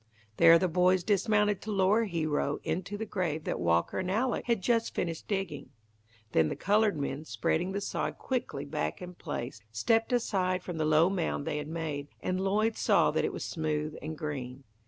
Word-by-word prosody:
There 165 0 +8
the 185 +2 +1
boys 180 +1 +3
dismounted 210 0 +2
to 220 - -5
lower 200 +3 +3
Hero 155 -6 -1
into 185 +3 -3
the 220 - -3
grave 170 -7 -2
that - - -2
Walker 85 -1 +1
and 185 - -2
Alec 235 +6 0
had 235 -3 +2
just 230 0 +1
finished 165 -2 -3
digging. 195 -8 -3 0.6
Then 80 -1 +3
the - - -3
coloured 210 -2 +2
men, 140 +1 -3
spreading 175 +3 -1
the 200 +1 -2
sod - - -2
quickly 235 - -3
back 75 - -3
in 180 0 -8
place, 120 - -5
stepped 225 - +1
aside 185 -6 +1
from 175 -3 -5
the 155 - +1
low 155 +2 +5
mound 170 -6 -1
they 150 - -2
had 150 - -5
made, 155 -3 -4
and 185 0 -1
Lloyd 215 +3 +1
saw - - +4
that - - 0
it - - -1
was - - -5
smooth 155 -2 -2
and 155 0 -5
green. 135 -4 -5
180 Hz, 190 wpm, -30 LUFS, 150-205 Hz, 0.6 s, There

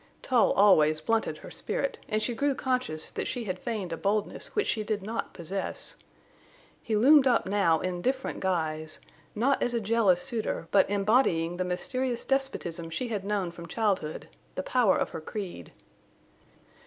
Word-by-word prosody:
Tull 250 -3 +3
always 155 -7 +5
blunted 225 +8 0
her - - -11
spirit, - - -2
and 215 0 0
she 240 - -1
grew 280 +4 0
conscious 255 - -1
that - - -3
she 245 - -3
had 185 -4 -4
feigned 210 -8 -3
a - - -4
boldness 205 +3 -2
which 425 - +2
she 220 - 0
did 210 -2 -2
not 225 +3 -4
possess. 185 +3 -4 0.9
He 220 - -1
loomed 270 +5 +6
up 245 -2 +3
now 190 -5 +2
in 180 -1 -3
different 260 +5 -1
guise, 155 -4 -2 0.4
not 260 +6 +2
as 240 - 0
a - - +2
jealous 210 -4 +3
suitor, 220 -6 -3
but 195 -1 +4
embodying 195 -5 +2
the 185 - 0
mysterious 245 +7 -2
despotism 180 -12 -2
she 240 +9 -3
had 210 -4 -2
known 200 -3 -1
from 170 0 -10
childhood—the 190 -3 -3
power 240 -4 +3
of - - -1
her - - -6
creed. 175 - -6
205 Hz, 165 wpm, -28 LUFS, 175-240 Hz, 0.9 s, loomed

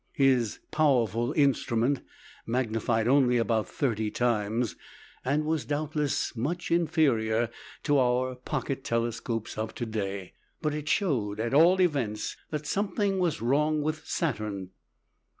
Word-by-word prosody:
His 130 -5 +2
"powerful" 120 -6 +2
instrument 135 -2 +2 0.5
magnified 115 -2 0
only 125 -2 +4
about 115 -2 +1
thirty 110 -6 -1
times, 115 0 0 0.5
and 145 +4 +1
was, 160 -1 0
doubtless, 150 -2 -1
much 160 +10 -3
inferior 130 -9 +2 0.3
to 145 -2 +3
our 130 0 +2
pocket 130 +1 -4
telescopes 115 -1 -2
of 110 - -3
to 120 - -3
day. 100 -4 -4 0.3
But 155 -3 -1
it 150 -1 -4
showed, 120 - 0
at 115 +3 -1
all 170 +6 +6
events, 130 - 0
that 150 -1 -4
something 195 +2 0
was 170 -10 0
wrong 150 +4 +2
with 155 +1 -2
Saturn. 105 - -2
130 Hz, 125 wpm, -28 LUFS, 115-150 Hz, 0.5 s, all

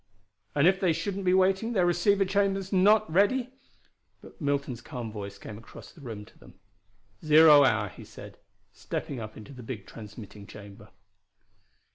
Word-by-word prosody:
"And 145 +1 +3
if 190 +1 +4
they 180 -4 +2
shouldn't 195 +3 -4
be 180 - +3
waiting 190 +5 +1
their 185 -5 +2
receiving 190 +3 +2
chamber 195 0 0
not 210 +3 +4
ready 240 +9 +1 0.3
" - - -46
But - - -16
Milton's 140 -4 -2
calm 120 -4 -7
voice 100 -2 -8
came 105 -1 -10
across 115 - -14
the 155 - -17
room 110 -6 -8
to - - -22
them: - - -17 0.7
"Zero 155 -1 +7
hour," 110 -5 +2
he - - -12
said, - - -13 0.3
stepping 135 - -5
up 110 -1 -8
into 110 +6 -11
the 125 - -11
big 110 -4 -7
transmitting 105 -2 -11
chamber. 100 -1 -13
150 Hz, 165 wpm, -27 LUFS, -, 0.7 s, Zero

